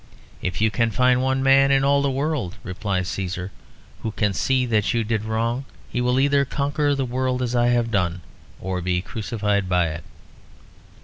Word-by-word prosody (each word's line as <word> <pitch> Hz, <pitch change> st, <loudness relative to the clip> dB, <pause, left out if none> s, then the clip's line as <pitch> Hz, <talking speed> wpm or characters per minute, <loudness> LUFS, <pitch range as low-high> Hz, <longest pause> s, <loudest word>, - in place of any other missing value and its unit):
"If 90 Hz, +2 st, -3 dB
you 110 Hz, 0 st, +3 dB
can 115 Hz, +3 st, +1 dB
find 125 Hz, +3 st, +3 dB
one 130 Hz, 0 st, +1 dB
man 135 Hz, 0 st, +5 dB
in 135 Hz, 0 st, +3 dB
all 140 Hz, 0 st, +3 dB
the 140 Hz, -, +1 dB
world," 135 Hz, -, -2 dB
replies 95 Hz, -2 st, -2 dB
Cæsar, 95 Hz, 0 st, -4 dB, 0.5 s
"who 110 Hz, -, -2 dB
can 105 Hz, -1 st, 0 dB
see 130 Hz, +5 st, +1 dB
that 110 Hz, -2 st, +1 dB
you 115 Hz, -, +1 dB
did 110 Hz, -1 st, -1 dB
wrong, 115 Hz, +4 st, -1 dB, 0.3 s
he 125 Hz, -, -1 dB
will 125 Hz, +1 st, +2 dB
either 140 Hz, 0 st, +3 dB
conquer 145 Hz, +1 st, 0 dB
the 135 Hz, -1 st, -1 dB
world 130 Hz, +1 st, -1 dB
as 125 Hz, 0 st, -2 dB
I 120 Hz, 0 st, +3 dB
have 120 Hz, -1 st, +1 dB
done 90 Hz, -4 st, 0 dB, 0.4 s
or 95 Hz, -1 st, -3 dB
be 90 Hz, 0 st, -1 dB
crucified 105 Hz, -3 st, -2 dB
by 90 Hz, -2 st, +2 dB
it." 80 Hz, 0 st, -6 dB
115 Hz, 185 wpm, -23 LUFS, 100-130 Hz, 0.5 s, man